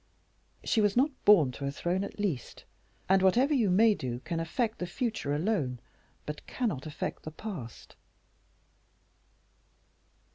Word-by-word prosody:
"She 220 - +2
was 205 +1 +2
not 280 +4 +4
born 170 -11 +6
to 140 +2 -6
a - - 0
throne, 175 +6 -1
at - - -7
least, 175 - -3 0.4
and 190 0 +4
whatever 245 +10 +4
you 235 -8 +3
may 215 +4 +5
do 125 -10 -4
can 165 +2 -3
affect 220 +7 -1
the 180 - -3
future 220 - -2
alone, 150 - 0 0.5
but 150 0 -7
cannot 200 - -2
affect 150 - -4
the - - -6
past." 155 - -8
185 Hz, 140 wpm, -30 LUFS, 150-220 Hz, 0.5 s, born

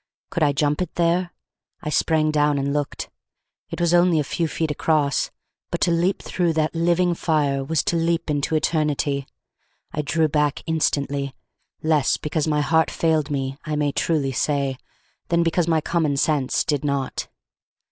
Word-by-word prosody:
Could 170 - -2
I 150 -2 +4
jump 145 +3 0
it 180 - -4
there? 175 +1 +1 0.5
I 150 - -2
sprang 155 0 +2
down 150 -1 +2
and 140 0 -1
looked. 145 -1 -3 0.6
It - - -6
was 170 0 +2
only 175 -2 +4
a - - +1
few 165 +4 -1
feet 160 0 -2
across; 150 -2 +1 0.4
but - - -2
to 175 - +3
leap 175 +3 +1
through 175 -3 0
that 155 -1 0
living 175 +1 +2
fire 145 -5 0
was 160 +3 0
to - - 0
leap 165 0 0
into 150 +1 0
eternity. 150 -3 0 0.7
I 150 - -1
drew 155 +2 +1
back 150 -1 0
instantly, 140 -4 -1 0.5
less 155 -3 +2
because 155 0 -2
my 150 -1 +2
heart 160 +3 +2
failed 160 -3 +1
me, 135 -1 -3
I 155 -1 -3
may 145 -1 +1
truly 140 -2 0
say, 135 0 0 0.5
than 170 0 +2
because 170 0 +1
my 160 -2 +2
common 155 -3 0
sense 140 -2 +1
did 145 -3 -1
not. 140 -2 -2
155 Hz, 165 wpm, -23 LUFS, 145-165 Hz, 0.7 s, I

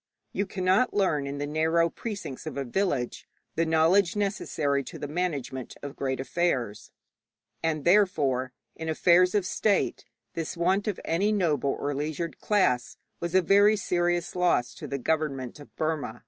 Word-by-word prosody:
You 200 - -1
cannot 190 +6 +1
learn 155 -8 +1
in 140 +1 -4
the 145 - -2
narrow 160 +3 +2
precincts 195 - -6
of 155 - -5
a 140 - -2
village 140 -4 -1 0.3
the 165 +1 0
knowledge 165 +4 +3
necessary 160 -9 -1
to - - -8
the 145 - -5
management 145 -6 -3
of 140 0 -6
great 130 -2 -2
affairs; 130 -8 -1 0.7
and 155 -2 -1
therefore 150 -10 +3 0.2
in 160 0 -5
affairs 180 +4 +4
of 200 -3 +2
state 200 +1 0 0.3
this 165 0 -4
want 190 +4 +1
of 205 - -2
any 195 +6 +1
noble 155 -9 +1
or 145 0 -1
leisured 155 +4 -3
class 125 - +1 0.2
was 170 +1 -3
a 185 - +5
very 205 +4 +5
serious 175 -3 0
loss 175 -9 +2
to - - -8
the 140 - -3
government 140 -3 -2
of 145 - -12
Burma. 155 -7 -2
160 Hz, 160 wpm, -27 LUFS, 140-185 Hz, 0.7 s, a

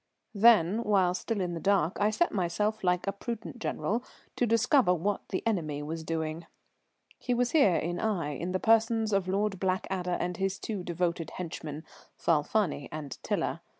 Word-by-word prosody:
Then, 215 -1 +5
while 195 -5 +3
still 205 +2 -2
in 175 -1 -2
the 165 - -4
dark, 190 -3 +2
I 205 - +4
set 280 +11 +1
myself 210 +3 -1
like 180 -1 +1
a 195 - 0
prudent 235 +4 -6
general 230 +1 -1 0.3
to 245 - +1
discover 230 -2 +4
what 195 +4 -1
the 185 - -3
enemy 155 -10 -1
was 160 +2 -5
doing. 160 0 -3 0.7
He 245 - -1
was 245 0 +1
here 240 - +5
in 175 +2 -1
Aix 170 -10 -1
in 175 +2 -2
the 185 - 0
persons 225 0 +3
of 195 -2 +1
Lord 195 0 0
Blackadder 185 -1 -1
and 175 -1 -2
his 195 0 -1
two 205 -5 -4
devoted 170 -1 -2
henchmen, 160 -3 -6 0.3
Falfani 160 0 +1
and 150 -3 -6
Tiler. - - -1
190 Hz, 170 wpm, -29 LUFS, 170-215 Hz, 0.7 s, Then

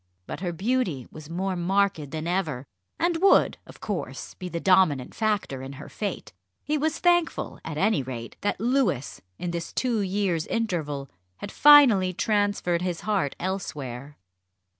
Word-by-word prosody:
But - - -6
her 180 -1 -2
beauty 185 - -1
was 155 -1 -11
more 185 +3 -2
marked 180 -4 +1
than 155 +1 -5
ever, 165 -7 -1 0.3
and 345 -1 +1
would, 390 - +4
of - - -13
course, - - -5
be 180 - -7
the 170 0 -3
dominant 180 -8 +3
factor 210 - -1
in 135 +1 -7
her 135 - -10
fate. 200 - -5 0.3
He 300 - -1
was 310 +2 0
thankful, 345 -1 +1
at 155 -2 -5
any 200 -1 +2
rate, 120 -3 -7
that 205 - -1
Louis 230 - 0 0.2
in 175 - -3
this 170 -1 -4
two 245 -4 0
years' 190 -4 -1
interval 155 -11 -2 0.3
had 205 - -7
finally 250 -11 +7
transferred 205 -4 0
his 180 -2 -2
heart 200 -10 0
elsewhere. 145 -8 -5
185 Hz, 155 wpm, -26 LUFS, 155-215 Hz, 0.3 s, finally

